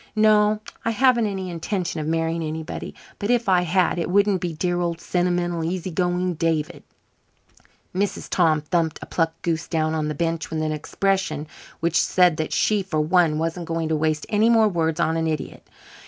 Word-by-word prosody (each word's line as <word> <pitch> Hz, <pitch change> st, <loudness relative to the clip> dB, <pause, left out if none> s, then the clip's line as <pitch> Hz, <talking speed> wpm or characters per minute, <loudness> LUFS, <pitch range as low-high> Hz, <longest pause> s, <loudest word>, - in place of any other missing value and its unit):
No, 215 Hz, 0 st, +4 dB, 0.2 s
I -, -, 0 dB
haven't 240 Hz, -1 st, +3 dB
any 190 Hz, -2 st, -4 dB
intention 170 Hz, 0 st, -3 dB
of 155 Hz, -, -3 dB
marrying 165 Hz, +1 st, 0 dB
anybody, 160 Hz, +1 st, -5 dB, 0.2 s
but 205 Hz, -, -3 dB
if 240 Hz, -2 st, +2 dB
I 185 Hz, -2 st, +4 dB
had 180 Hz, 0 st, +1 dB
it 170 Hz, -, -2 dB
wouldn't 200 Hz, -1 st, +3 dB
be 175 Hz, -, -2 dB
dear 175 Hz, +3 st, -1 dB
old 170 Hz, -1 st, -2 dB
sentimental, 175 Hz, -1 st, -1 dB
easy 180 Hz, +2 st, -3 dB
going 180 Hz, +1 st, 0 dB
David." 160 Hz, 0 st, -1 dB, 1.1 s
Mrs. 195 Hz, +2 st, -2 dB
Tom 160 Hz, -4 st, +2 dB
thumped 160 Hz, +1 st, 0 dB
a -, -, -7 dB
plucked 165 Hz, -1 st, -1 dB
goose 165 Hz, -1 st, -1 dB
down 160 Hz, -1 st, 0 dB
on 155 Hz, -1 st, -1 dB
the 150 Hz, -, -3 dB
bench 165 Hz, +1 st, -2 dB
with 160 Hz, -1 st, -2 dB
an 155 Hz, -, -1 dB
expression 155 Hz, 0 st, -1 dB, 0.4 s
which 170 Hz, 0 st, +2 dB
said 180 Hz, -3 st, +3 dB
that 155 Hz, -2 st, -2 dB
she, 210 Hz, -2 st, +2 dB
for 185 Hz, -5 st, -2 dB
one, 160 Hz, 0 st, +3 dB
wasn't 165 Hz, +1 st, -3 dB
going 165 Hz, -1 st, -2 dB
to 160 Hz, -, +1 dB
waste 155 Hz, 0 st, 0 dB
any 215 Hz, +2 st, +3 dB
more 225 Hz, -2 st, +5 dB
words 165 Hz, -4 st, 0 dB
on 165 Hz, -1 st, +1 dB
an 160 Hz, 0 st, 0 dB
idiot. 155 Hz, -2 st, -4 dB
170 Hz, 185 wpm, -23 LUFS, 160-190 Hz, 1.1 s, more